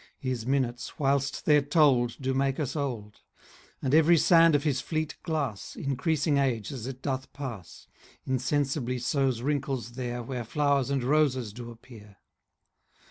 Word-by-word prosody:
His 125 -3 -4
minutes, 125 -3 -1
whilst 140 -1 0
they're 150 -1 +5
told, 140 -5 +3
Do 130 -1 -1
make 135 +1 0
us 140 -2 -2
old; 120 -8 -4 0.6
And 135 0 0
every 160 +2 +6
sand 165 -1 +5
of 145 - +1
his 140 -5 0
fleet 155 -1 -3
glass, 140 -11 -3
Increasing 140 +2 0
age 120 -7 0
as 125 -4 -6
it 130 -1 -8
doth 130 -1 -3
pass, 120 - -8 0.4
10 130 - -2
Insensibly 130 -1 0
sows 130 -1 0
wrinkles 135 -4 -2
there 120 -1 -4
Where 125 0 -4
flowers 140 +3 +1
and 140 -2 0
roses 130 -5 +1
do 120 +1 -8
appear. 110 -3 -14
135 Hz, 150 wpm, -28 LUFS, 120-145 Hz, 0.6 s, every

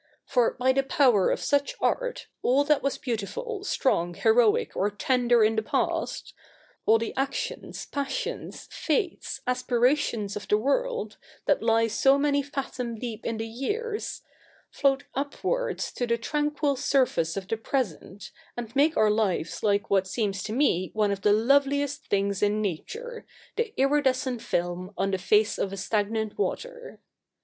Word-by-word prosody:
For 245 -4 +2
by 260 +1 +2
the 270 - +3
power 260 -7 +3
of - - 0
such 285 0 +1
art, - - -1 0.2
all 270 +3 +3
that 295 0 +2
was 275 - -1
beautiful, 385 - -4
strong, 190 - 0
heroic, 225 +1 +3
or 200 - +1
tender 240 +2 +2
in 220 +1 +3
the 220 - +1
past - - -2 0.3
— - - -32
all 225 - +6
the 225 0 -4
actions, 270 +1 -3
passions, 280 -2 -4
faiths, 355 - -2
aspirations 245 -4 +1
of 205 - -6
the 210 - +3
world, 470 - -1 0.3
that 290 - +2
lie 225 0 +3
so 270 +5 +3
many 285 0 +2
fathom 265 -4 -4
deep 230 -1 -5
in 230 - -2
the 225 - -3
years 415 - -4 0.2
— - - -32
float 275 -1 +2
upwards 290 - -2
to 245 - -3
the 235 0 +1
tranquil 295 +3 0
surface 250 -11 +1
of 190 -1 -4
the 225 - 0
present, 210 - -3 0.3
and 235 0 -6
make 300 +4 +3
our 215 -1 +4
lives 200 -6 0
like 205 -1 +1
what 190 -1 +3
seems 195 -1 -1
to 215 - -5
me 220 - +2
one 210 -2 +2
of 200 -1 -3
the 205 - +4
loveliest 280 +5 +2
things 200 -1 0
in 210 +1 +2
nature, 450 - -4 0.3
the 465 -2 -1
iridescent 265 -3 +2
film 175 +3 -2
on 195 +2 0
the 190 - -1
face 210 +3 +2
of 195 - -1
a 195 - -5
stagnant 215 - -1
water. - - -4
240 Hz, 160 wpm, -27 LUFS, 210-280 Hz, 0.3 s, all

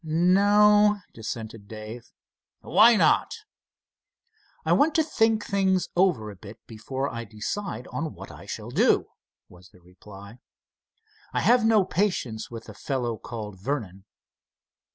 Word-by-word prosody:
"No," 205 +5 +4
dissented 110 -1 -7
Dave. 110 +2 -9 0.5
"Why 230 +2 +5
not?" 330 - +2 1.3
"I - - +3
want 305 +2 +3
to 320 - +4
think 225 -7 +1
things 190 -2 +1
over 175 - +1
a - - -12
bit, 100 +3 -12
before 130 +5 -5
I 120 -3 -5
decide 120 - -5
on 160 -1 -4
what - - -10
I - - -13
shall - - -7
do," - - +2 0.4
was 90 +1 -17
the 90 - -21
reply. 100 +5 -14 0.9
"I - - 0
have 240 0 +4
no 220 -3 +4
patience 165 - -2
with 115 -1 -8
the 105 - -11
fellow 120 +1 -3
called 105 -5 -8
Vernon." 100 -7 -4
130 Hz, 135 wpm, -25 LUFS, -, 1.3 s, Why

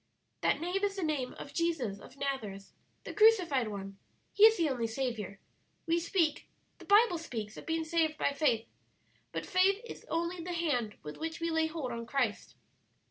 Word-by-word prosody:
"That - - +2
name 360 +5 -2
is 400 -1 +1
the 385 - -3
name 290 -5 -1
of 280 - -9
Jesus 300 -13 -1
of 260 - -14
Nazareth, 225 -9 -4 0.3
the - - -7
crucified 365 - +5
One. 195 -1 -7 0.3
He 420 - +8
is 445 0 +7
the 335 -3 +2
only 245 -5 -1
Saviour. 225 -5 -3 0.5
We 335 +1 +2
speak 335 -2 0 0.3
the - - -12
Bible 405 -4 +5
speaks 220 -9 -5
of - - -10
being 325 0 0
saved 315 -1 +1
by 285 - +1
faith, 265 -6 +1 0.7
but - - -4
faith 385 +1 +3
is - - -9
only 340 +1 -2
the 355 +1 -4
hand 270 -11 -1
with 150 - -7
which 325 +1 -4
we 335 0 -1
lay 320 0 +2
hold 310 -6 -4
on 235 0 -5
Christ. 245 -5 -1
310 Hz, 185 wpm, -32 LUFS, 235-340 Hz, 0.7 s, He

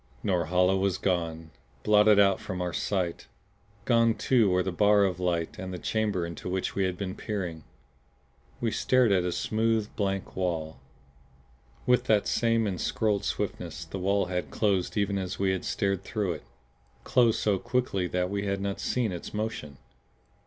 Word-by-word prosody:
Norhala 90 0 +2
was 95 -1 +1
gone, 80 -3 -2 0.3
blotted 105 0 +5
out 100 -1 +5
from 95 - -5
our 90 -1 -2
sight! 90 -4 -2 0.6
Gone 115 -2 +4
too 120 -6 +3
were 90 0 +2
the 95 - -2
bar 105 +2 +4
of 90 -3 0
light 85 -2 -1
and 95 0 -5
the 90 - -4
chamber 105 -2 -1
into 85 +1 -6
which 95 0 -2
we 95 - +1
had 90 -1 -2
been 95 -1 -4
peering. 90 -7 -4 1.0
We 115 -2 0
stared 125 -2 +3
at 95 -2 +3
a 90 - 0
smooth, 110 +3 0
blank 100 -2 -2
wall. 80 -4 -2 1.1
With 125 0 +3
that 105 -4 +3
same 115 -1 +2
ensorcelled 100 +1 0
swiftness 80 - -3
the 80 +4 -6
wall 100 +1 +1
had 90 0 -3
closed 100 -2 0
even 100 -1 +1
as 95 0 -4
we 95 -1 +1
had 95 - -2
stared 100 -2 -1
through 100 -3 -2
it; - - -9 0.6
closed 120 -3 +3
so 100 -3 +1
quickly 120 -7 -1
that 90 +1 -1
we 100 0 -2
had 100 0 -1
not 100 0 -3
seen 120 -5 0
its 90 +3 -7
motion. 105 -10 -4
95 Hz, 165 wpm, -28 LUFS, 90-105 Hz, 1.1 s, blotted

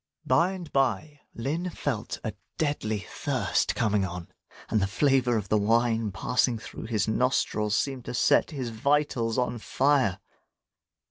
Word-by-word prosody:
By 175 +4 +3
and 180 -4 -8
by, 135 +2 0 0.2
Lin 155 +10 -2
felt 135 -9 -3
a 110 - -3 0.2
deadly 110 - -1
thirst - - -1
coming 105 -2 +1
on; 90 -2 -5 0.4
and 110 - +2
the 95 - +2
flavour 125 +2 +2
of 100 -3 -4
the 110 - +3
wine 115 0 +2
passing 125 +4 +1
through 110 - -8
his 110 -2 0
nostrils, 110 -2 +1
seemed 135 -3 -2
to - - -4
set - - +3
his 135 -7 -4
vitals 120 -1 +1
on 125 -1 0
fire. 130 -5 +2
120 Hz, 145 wpm, -27 LUFS, 110-140 Hz, 0.4 s, By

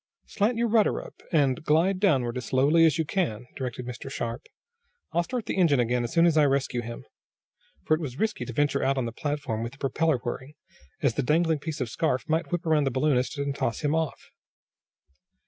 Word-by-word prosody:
"Slant 220 +4 0
your 235 0 +2
rudder 220 -2 +3
up, - - -12
and 145 -2 +2
glide 170 +5 +2
downward 130 - +2
as 125 - -4
slowly 150 +6 +4
as 160 - +1
you 160 - 0
can!" 145 - -1
directed 125 -2 -5
Mr. 125 +2 -7
Sharp. 115 -3 -4 0.7
"I'll 170 - +2
start 235 +5 -4
the - - -3
engine 160 -8 +4
again 120 0 +1
as 120 - -4
soon 165 0 +4
as 165 -2 +3
I 150 - +6
rescue 135 -3 0
him," 115 0 -8 0.8
for - - +3
it 155 - +1
was 135 -5 -5
risky 220 +3 -1
to - - -6
venture 145 +2 +1
out 135 0 +1
on 130 - 0
the 115 - -3
platform 145 -3 -3
with 115 +2 -4
the - - -15
propeller 145 +2 +1
whirring, 130 +4 -6 0.5
as 135 - +3
the 145 - 0
dangling 160 +3 +2
piece 155 0 -5
of 125 - -1
scarf 130 -3 -1
might 160 +3 0
whip 175 -1 -2
around 155 -3 +3
the - - +2
balloonist 130 +1 +1
and 140 0 -1
toss 115 -5 -2
him 150 0 +1
off. 160 -2 -2
145 Hz, 215 wpm, -27 LUFS, 125-165 Hz, 0.8 s, I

